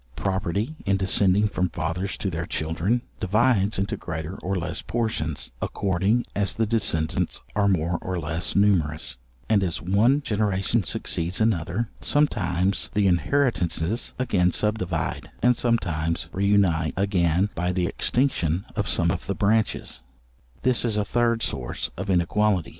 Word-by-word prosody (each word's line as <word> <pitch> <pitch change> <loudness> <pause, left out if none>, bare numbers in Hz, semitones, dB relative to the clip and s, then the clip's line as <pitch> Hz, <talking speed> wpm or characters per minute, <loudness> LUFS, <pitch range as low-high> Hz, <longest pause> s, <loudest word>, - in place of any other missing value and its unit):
—Property 100 - -1
in 100 -1 +1
descending 95 +1 +3
from 90 -3 -1
fathers 90 +6 -3
to 95 - -2
their 85 0 -3
children, 85 +10 -1 0.2
divides 105 +1 +2
into 100 +1 -1
greater 80 +1 -5
or 95 +2 -3
less 90 - -2
portions, 80 - -2
according 100 +5 0
as 100 -3 0
the 115 - +1
descendants 95 -8 -1
are 100 -1 +3
more 85 -2 +1
or 95 0 -3
less 80 +1 -1
numerous, 80 -10 +2 0.3
and 105 -2 +3
as 85 -3 -1
one 110 - +2
generation 105 -1 0
succeeds 85 +1 -2
another, 110 0 0
sometimes 100 - +1
the 105 -1 +3
inheritances 90 - +1
again 95 -8 +2
subdivide, 95 -6 -2
and 125 0 +5
sometimes 85 -9 0
re 100 +1 0
unite 85 -7 +2
again 95 -1 +2
by 90 +1 -1
the 90 -1 0
extinction 95 - 0
of - - -1
some - - +3
of - - -4
the - - -1
branches; 110 +1 0 0.6
this 130 -2 +2
is 110 -3 0
a 105 - +1
third 115 0 +1
source 65 -3 -3
of 95 +2 -5
inequality. 95 +1 +2
95 Hz, 140 wpm, -25 LUFS, 85-110 Hz, 0.6 s, and